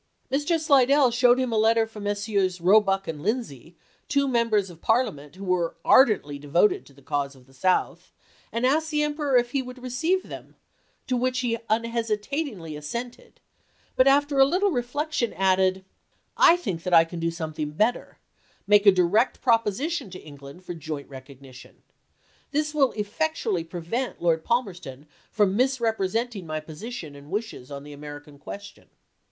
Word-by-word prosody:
Mr. 295 +5 +1
Slidell 280 -3 +4
showed 245 +1 +4
him 255 -2 -1
a 220 - +1
letter 225 +1 +3
from 215 -2 -10
Messrs. 205 -3 0
Eoebuck 195 +2 +3
and 155 -2 -5
Lindsay, 175 - -4
isea. - - -36
two 280 -1 +1
Members 230 -6 +1
of 165 - -16
Parliament 175 - 0
who 195 +1 -8
were 180 -2 0
ardently 195 - +4
devoted 150 +8 +1
to 140 - -18
the 140 0 -20
cause 140 -1 -2
of 130 -1 -19
the 135 - -22
South, 185 +8 0 0.4
and 235 +2 -1
asked 315 +4 +2
the 300 -1 +1
Emperor 295 -3 +1
if 240 0 +1
he 275 - 0
would 250 0 -9
receive 320 +10 0
them, - - -11 0.5
to 255 - -1
which 255 +1 0
he 230 -2 -1
unhesitatingly 225 - -2
assented; 235 +12 -7 0.6
but 255 - +4
after 285 0 +3
a - - +9
little 370 +8 +2
reflection 250 0 -2
added, 190 0 +1 0.3
" - - -44 0.2
I 345 - +3
think 195 - -4
that 180 0 +1
I 165 0 +7
can 170 +1 -8
do 165 0 0
something 155 -2 -4
better 215 +11 -1 0.3
— - - -36
make 205 +1 +4
a - - +11
du 180 -2 +3
ect 240 +4 +2
proposition 235 - 0
to 185 0 -9
England 145 +3 -13
for 175 - -5
joint 155 -3 -7
recognition. 135 -1 -13 0.7
This 300 +1 -1
will 280 -4 +3
effectually 220 - -2
prevent 175 +10 -4
Lord 165 -2 +1
Palmerston 180 - -3 0.2
from 205 -3 +1
misrepresenting 230 -4 0
my 155 0 -3
position 160 0 -8
and 140 +1 -13
wishes 210 - -5
on 140 -1 -7
the 145 0 -10
American 145 0 -10
question." 200 +6 -10
210 Hz, 170 wpm, -25 LUFS, 165-250 Hz, 0.7 s, a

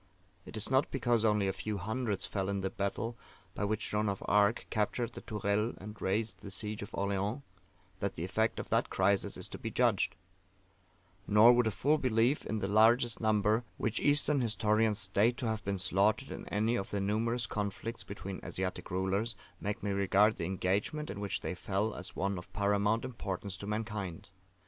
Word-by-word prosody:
It - - -6
is 110 - 0
not 130 +2 +3
because 120 -4 +1
only 105 -3 +3
a 95 - 0
few 100 +3 -3
hundreds 110 +1 -2
fell 95 -1 -2
in 100 -1 -1
the 95 - -2
battle 115 +4 -2 0.4
by 105 - -2
which 105 +1 -2
Joan 105 0 +1
of 100 - -3
Arc 105 +2 +3
captured 115 +2 0
the - - -8
Tourelles 105 +1 -1
and 105 +2 -9
raised 110 +4 -1
the 100 - -8
siege 105 +3 -3
of 100 - -7
Orleans, 100 +6 -1 0.6
that 100 -1 -2
the 80 - -4
effect 110 +4 0
of - - -6
that - - +2
crisis 100 +1 +2
is - - -2
to - - -8
be - - -4
judged: - - +2 1.1
nor 110 +4 +8
would 120 -1 +3
a - - +4
full 140 - +2
belief 125 +2 +2
in 110 - -1
the 95 - -1
largest 115 +4 +4
number 110 +1 +2
which 110 - -1
Eastern 145 -1 +4
historians 110 -1 +2
state 100 +4 +2
to 130 - -3
have 110 -1 -2
been 100 0 -1
slaughtered 100 +7 +2
in - - -7
any 110 +3 +1
of 95 - -4
the 100 - -1
numerous 115 +4 0
conflicts 105 +3 -4
between 100 -1 -7
Asiatic 95 0 -3
rulers, 95 +5 0 0.2
make 105 +2 -3
me 100 - 0
regard 100 +2 +3
the 85 - -2
engagement 95 - -1
in 100 - -6
which 100 -1 -2
they - - -3
fell 100 +4 -1
as 90 - -8
one 95 0 -1
of 90 - -12
paramount 105 +2 +1
importance 100 -5 -4
to 100 - -7
mankind. 105 -6 -4
105 Hz, 190 wpm, -32 LUFS, 100-115 Hz, 1.1 s, nor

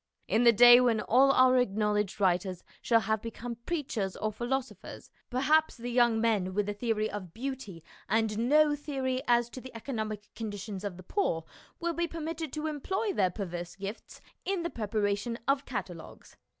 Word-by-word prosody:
In 230 +2 +2
the 235 - +9
day 240 +2 +9
when 235 -3 +3
all 265 +5 +4
our 255 -1 +5
acknowledged 210 -3 0
writers 185 -1 +1 0.2
shall 230 -1 +3
have 220 +1 -1
become 230 +1 -6
preachers 255 - -2
or 215 - -2
philosophers, 240 0 -5 0.2
perhaps 300 +5 +2
the 245 +1 -5
young 235 -2 +3
men 205 -5 +1
with 205 -1 0
a 205 - -1
theory 215 0 -1
of 190 -5 -7
beauty 240 - -6 0.3
and 220 +2 +1
no 300 0 +5
theory 265 -3 -2
as 240 -1 +3
to 255 - -8
the 260 -1 -11
economic 215 -3 -5
conditions 205 -2 -6
of 200 -4 -4
the 185 - -11
poor 170 - -1 0.4
will 340 0 -1
be 340 +1 -1
per 330 - -7
mitted 320 -1 -4
to 305 0 -3
employ 380 +7 -2
their 185 -2 +2
perverse 175 -2 -6
gifts 195 +3 -8 0.2
in 385 -3 -1
the 340 - -3
preparation 210 +1 -1
of 275 +1 +1
catalogues. - - -7
230 Hz, 175 wpm, -30 LUFS, 205-265 Hz, 0.4 s, the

